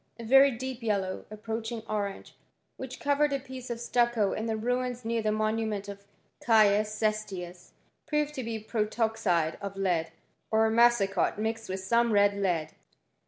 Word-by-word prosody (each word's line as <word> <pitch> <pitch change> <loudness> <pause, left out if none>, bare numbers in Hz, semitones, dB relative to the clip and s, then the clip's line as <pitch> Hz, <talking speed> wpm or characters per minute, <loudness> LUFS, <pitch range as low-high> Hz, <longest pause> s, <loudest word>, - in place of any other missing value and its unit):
A 235 - -8
very 270 +4 +6
deep 260 0 -5
yellow, 200 -4 -1
approaching 225 +1 -5
orange, 205 -2 -4 0.4
which 260 -1 -8
covered 285 +1 +2
a 275 - 0
piece 260 -1 -9
of 235 -1 -4
stucco 235 -3 +1
in 220 - -3
the 220 -1 -1
ruins 245 +1 -2
near 230 0 0
the 215 -1 0
monument 215 -1 -1
of 200 0 -9 0.4
Caius 215 -2 +4
Ces 215 0 0
tius, 180 -3 -9 0.3
proved 300 -1 0
to 260 - -4
be 225 -1 -3
protoxide 215 -6 0
of 200 -1 -6
lead, 175 -5 0 0.4
or 220 0 +3
massicot, 225 -6 +3
mixed 220 0 -3
with 190 0 -3
some 235 +4 +2
red 205 0 +4
lead. 175 -6 -1
220 Hz, 160 wpm, -29 LUFS, 200-235 Hz, 0.4 s, very